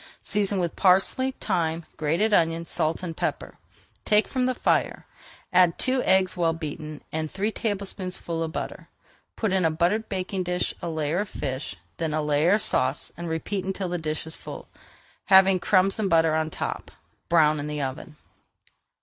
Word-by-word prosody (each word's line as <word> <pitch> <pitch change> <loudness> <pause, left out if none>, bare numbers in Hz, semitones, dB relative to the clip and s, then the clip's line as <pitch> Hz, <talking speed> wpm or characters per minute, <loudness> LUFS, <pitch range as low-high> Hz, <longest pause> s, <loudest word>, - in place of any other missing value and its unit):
Season 205 -1 0
with 170 -2 -2
parsley, 200 +8 +3
thyme, 165 -4 -1
grated 170 +9 +1
onion, 165 -2 +2
salt, 165 +1 -1
and 165 -2 -4
pepper, - - -3 0.4
take 210 0 +3
from 255 -1 0
the 255 - 0
fire, - - 0 0.5
add 180 -2 +5
two 260 0 +2
eggs 190 -1 +3
well 170 -2 +1
beaten, 155 -1 -7
and 155 0 -2
three 205 +6 -2
tablespoonfuls 190 -6 -3
of 160 - -6
butter. - - -6 0.5
Put 215 -4 -1
in 190 -1 +2
a 160 - +4
buttered 180 +8 0
baking 190 0 -2
dish 180 0 -1
a 170 - -3
layer 160 +1 -1
of 205 -1 -2
fish, 135 0 -4 0.2
then 160 -2 -1
a 155 - 0
layer 150 +4 +3
of 210 - +3
sauce, 130 +3 +2
and 170 +1 -5
repeat 180 +4 -2
until 190 -1 -3
the 175 0 -2
dish 155 -1 -3
is 160 - -4
full, - - -9 0.6
having 190 -1 +6
crumbs 190 +2 +2
and 205 -3 0
butter 160 -2 +4
on 160 0 0
top. - - -4 0.4
Brown 155 -3 +4
in 145 - -4
the 150 -1 -3
oven. 135 +3 -6
175 Hz, 175 wpm, -25 LUFS, 160-195 Hz, 0.6 s, having